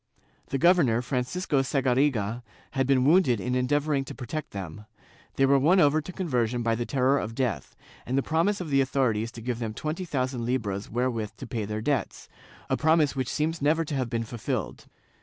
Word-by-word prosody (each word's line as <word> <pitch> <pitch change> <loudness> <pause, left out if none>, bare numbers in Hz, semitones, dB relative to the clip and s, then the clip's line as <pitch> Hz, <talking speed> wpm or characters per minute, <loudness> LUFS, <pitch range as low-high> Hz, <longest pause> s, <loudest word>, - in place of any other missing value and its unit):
The 135 - -1
gover 175 +4 +5
nor, 120 -1 +1
Francisco 135 +4 -1
Sagariga, 130 -4 +1 0.3
had 135 -1 0
been 130 -2 +3
wounded 150 - +4
in 125 +6 -2
endeavoring 140 +3 +1
to - - -8
protect 145 +5 -5
them; 100 +1 -8 0.5
they 135 - +3
were 140 0 +4
won 170 +8 +4
over 150 -1 +4
to 150 - -8
conversion 125 - -1
by 115 0 +1
the 120 +1 -2
terror 135 +1 +2
of 115 +1 -5
death, 115 - -2 0.3
and 130 +3 -2
the 135 - +2
promise 170 +6 +1
of 170 -5 -5
the 135 0 +4
authorities 120 -4 0
to 115 - -9
give 120 0 -3
them 110 -2 -4
twenty 155 +4 -3
thousand 130 -5 -2
libras 105 -5 -2
wherewith 115 -3 -2
to - - -7
pay 110 -4 -3
their 105 +1 -4
debts, 135 -3 -2 0.2
— - - -22
a - - +4
promise 155 +1 +3
which 130 -3 -2
seems 160 +1 -1
never 160 +3 +2
to 150 - -5
have 130 -3 -1
been 115 -1 -1
fulfilled. 120 0 -4
130 Hz, 200 wpm, -27 LUFS, 115-150 Hz, 0.5 s, gover